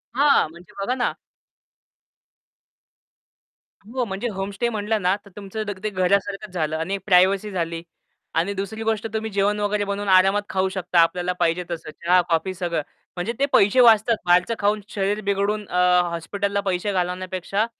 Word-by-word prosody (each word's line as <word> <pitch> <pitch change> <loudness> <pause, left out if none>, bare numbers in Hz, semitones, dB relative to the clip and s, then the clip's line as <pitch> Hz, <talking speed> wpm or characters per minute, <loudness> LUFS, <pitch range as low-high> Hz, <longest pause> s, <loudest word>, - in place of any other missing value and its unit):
हां, 280 - +4
म्हणजे 170 +2 -16
बघा 250 +6 -1
ना 245 - 0 2.7
हो, 250 +2 -2
म्हणजे 200 +3 -4
होमस्टे 200 +4 -3
म्हटलं 215 -1 -1
ना, 180 +2 +2
तर 200 - -14
तुमचं 205 +2 -5
दग 200 -2 -5
ते 215 - 0
घरासारखंच 195 +1 0
झालं 155 -2 -1
आणि 180 +5 -2
प्रायव्हसी 195 +2 +3
झाली. 165 -2 -3 0.5
आणि 175 +5 0
दुसरी 200 +3 -5
गोष्ट, 220 0 -1
तुम्ही 220 0 -2
जेवण 200 +1 +1
वगैरे 205 0 0
बनवून 200 0 -3
आरामात 195 +2 +5
खाऊ 190 0 0
शकता. 180 -2 0
आपल्याला 180 +2 +2
पाहिजे 170 +2 +1
तसं 160 -2 -5
चहा, 180 +3 +2
कॉफी, 165 +3 0
सगळं. 175 -3 -2 0.3
म्हणजे 180 +6 -2
ते 280 - +4
पैसे 205 +6 +5
वाचतात. 225 0 +5
बाहेरचं 180 +5 +3
खाऊन 205 +1 +1
शरीर 205 +1 -1
बिघडून 200 +1 0
अ, 180 - -1 0.3
हॉस्पिटलला 200 +4 -2
पैसे 190 +2 -1
घालवण्यापेक्षा 185 +3 -1
195 Hz, 155 wpm, -23 LUFS, 180-210 Hz, 2.7 s, आरामात